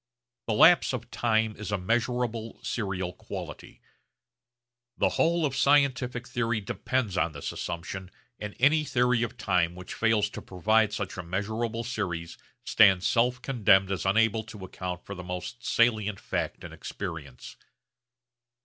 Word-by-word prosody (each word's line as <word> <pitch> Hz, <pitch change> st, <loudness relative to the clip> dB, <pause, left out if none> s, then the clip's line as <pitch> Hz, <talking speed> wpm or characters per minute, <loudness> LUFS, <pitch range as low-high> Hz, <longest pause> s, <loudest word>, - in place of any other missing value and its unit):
The 110 Hz, -, +1 dB
lapse 170 Hz, +4 st, +6 dB
of 125 Hz, -, -5 dB
time 110 Hz, -2 st, +1 dB
is 110 Hz, 0 st, -6 dB
a 100 Hz, -, +1 dB
measurable 115 Hz, +2 st, -1 dB
serial 95 Hz, -5 st, -2 dB
quantity. -, -, -8 dB, 1.2 s
The -, -, +3 dB
whole 170 Hz, 0 st, +2 dB
of 135 Hz, -2 st, -2 dB
scientific 130 Hz, -4 st, +2 dB
theory 120 Hz, -2 st, -1 dB
depends 105 Hz, 0 st, -2 dB
on 85 Hz, -3 st, +1 dB
this 70 Hz, -, -5 dB
assumption 90 Hz, +2 st, -5 dB, 0.3 s
and 105 Hz, -1 st, -6 dB
any 150 Hz, +4 st, +4 dB
theory 125 Hz, -4 st, +2 dB
of 120 Hz, -, -3 dB
time 85 Hz, -1 st, +1 dB
which 90 Hz, 0 st, -8 dB
fails 110 Hz, -2 st, +2 dB
to -, -, -7 dB
provide 110 Hz, +4 st, +2 dB
such 105 Hz, -3 st, -4 dB
a -, -, -3 dB
measurable 110 Hz, +6 st, -2 dB
series 90 Hz, -8 st, -4 dB, 0.2 s
stands 95 Hz, -4 st, +5 dB
self 125 Hz, +1 st, +2 dB
condemned 100 Hz, -7 st, +3 dB
as 95 Hz, -, -2 dB
unable 110 Hz, +3 st, +2 dB
to 105 Hz, -3 st, -9 dB
account 90 Hz, -1 st, -6 dB
for 100 Hz, -, -6 dB
the 90 Hz, -2 st, -8 dB
most 90 Hz, +7 st, -6 dB
salient 110 Hz, -4 st, +2 dB
fact -, -, -3 dB
in -, -, -8 dB
experience. 80 Hz, -9 st, -7 dB
110 Hz, 145 wpm, -28 LUFS, 95-120 Hz, 1.2 s, lapse